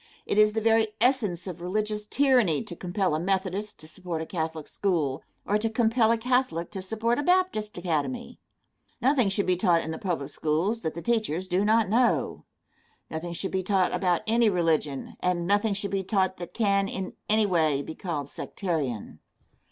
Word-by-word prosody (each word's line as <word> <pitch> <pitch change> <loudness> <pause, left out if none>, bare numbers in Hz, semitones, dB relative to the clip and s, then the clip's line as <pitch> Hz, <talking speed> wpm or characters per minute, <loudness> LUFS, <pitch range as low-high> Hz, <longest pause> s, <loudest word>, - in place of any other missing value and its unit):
It 205 - +1
is 210 0 +5
the 220 - -1
very 225 0 +4
essence 220 -8 +2
of 180 -3 -7
religious 210 +3 -2
tyranny 245 - +3
to 175 - -8
compel 180 0 -1
a 155 - 0
Methodist 195 +3 -2
to 155 - -12
support 170 0 -5
a 160 - -3
Catholic 160 -3 -4
school, 160 -8 -1 0.2
or 210 +1 +1
to 225 +1 0
compel 225 0 +2
a 230 - +3
Catholic 245 -8 0
to 195 - -5
support 225 +5 -1
a - - -1
Baptist 355 - +1
academy. 155 -7 -2 0.6
Nothing 255 -3 +3
should 195 +1 0
be 185 - +2
taught 175 -2 +2
in 160 - -4
the 160 - -5
public 175 -9 -3
schools 170 +9 0
that 160 - -3
the 170 - -6
teachers 215 -7 0
do 185 +2 +1
not 220 0 +3
know. 235 +5 +1 0.7
Nothing 170 +2 -4
should 190 +3 -3
be 190 - 0
taught 185 -1 +1
about 180 -3 +1
any 230 0 +3
religion, 160 -6 0
and 180 -1 0
nothing 205 +2 +2
should 200 0 -3
be 195 -1 0
taught 190 -1 0
that 175 -1 -8
can, 200 -3 +2
in 190 -1 -5 0.2
any 215 0 +4
way, 155 -7 +2
be 160 - -7
called 155 -6 -4
sectarian. 145 - -4
190 Hz, 185 wpm, -27 LUFS, 170-220 Hz, 0.7 s, is